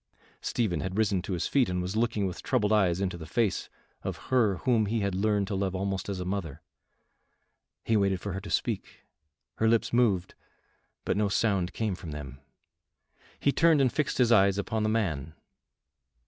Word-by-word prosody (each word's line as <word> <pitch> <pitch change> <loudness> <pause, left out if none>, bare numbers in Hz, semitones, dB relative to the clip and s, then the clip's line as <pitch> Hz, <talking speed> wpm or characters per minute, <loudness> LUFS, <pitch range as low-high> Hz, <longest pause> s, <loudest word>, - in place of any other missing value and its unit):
Stephen 100 -9 -1
had 95 +3 -4
risen 100 -4 +2
to 95 - -4
his 85 -1 -1
feet 130 -8 +2
and 90 0 -1
was 90 +3 -3
looking 110 -3 +1
with 90 -2 -4
troubled 105 +1 +1
eyes 95 -4 +3
into 90 -3 -2
the 80 - -8
face 110 +4 0 0.3
of - - -4
her 115 -7 +3
whom 115 -5 +3
he 110 +1 0
had 100 -1 -1
learned 100 +1 +1
to 100 - -5
love 95 -1 -1
almost 95 0 -2
as 95 -2 -3
a 90 - -4
mother. 90 -6 -4 1.2
He 115 - +2
waited 100 -3 +2
for 100 +1 -5
her 95 - -4
to - - -9
speak. - - -2 0.5
Her 110 - +2
lips 115 +1 +2
moved, 105 -7 +2 0.7
but - - 0
no 105 -1 +2
sound 100 -4 +1
came 110 -3 -1
from 90 -2 -8
them. 70 -3 -7 1.0
He 140 - +3
turned 165 0 +4
and 130 -3 +2
fixed 150 - -1
his 120 -2 +3
eyes 100 -3 +5
upon 110 +2 -1
the 110 - +1
man. 80 -10 -1
100 Hz, 190 wpm, -28 LUFS, 90-110 Hz, 1.2 s, eyes